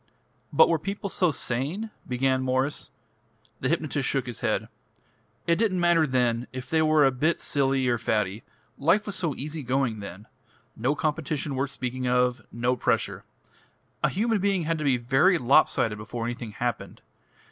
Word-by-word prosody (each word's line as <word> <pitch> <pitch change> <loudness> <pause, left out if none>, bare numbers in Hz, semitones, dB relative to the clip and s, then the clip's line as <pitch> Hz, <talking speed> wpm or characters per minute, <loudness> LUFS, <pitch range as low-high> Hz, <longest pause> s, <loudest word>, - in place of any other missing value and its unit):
"But - - +6
were 165 -2 +1
people 200 +4 -4
so 180 -2 +2
sane 150 - -3
?" - - -27
began 130 +1 +1
Mwres. 130 +2 -1 0.7
The 130 - -1
hypnotist 150 -4 0
shook 135 -2 0
his 120 -3 -6
head. - - -1 0.8
"It 170 0 +2
didn't 200 -5 +1
matter 170 -2 +4
then 125 -2 +1
if 130 0 -7
they 160 -1 +2
were 155 -2 +4
a 135 - +4
bit 155 +7 0
silly 135 -2 +1
or 120 -1 +1
faddy. 105 -1 -1 0.4
Life 180 +9 +3
was 205 - -4
so 170 -6 -1
easy 150 +3 -4
going 125 -3 0
then. 100 0 -9 0.5
No 130 +6 0
competition 150 -1 -2
worth 135 +1 -1
speaking 130 -1 -4
of 125 0 +2
no 120 +2 0
pressure. - - -1 0.8
A - - +4
human 220 +2 0
being 195 -2 +1
had 165 0 -1
to - - -2
be 135 -3 +3
very 135 +10 +3
lopsided 120 -5 +3
before 115 +2 -5
anything 120 -2 -5
happened. 120 +2 -4
135 Hz, 170 wpm, -26 LUFS, 125-160 Hz, 0.8 s, But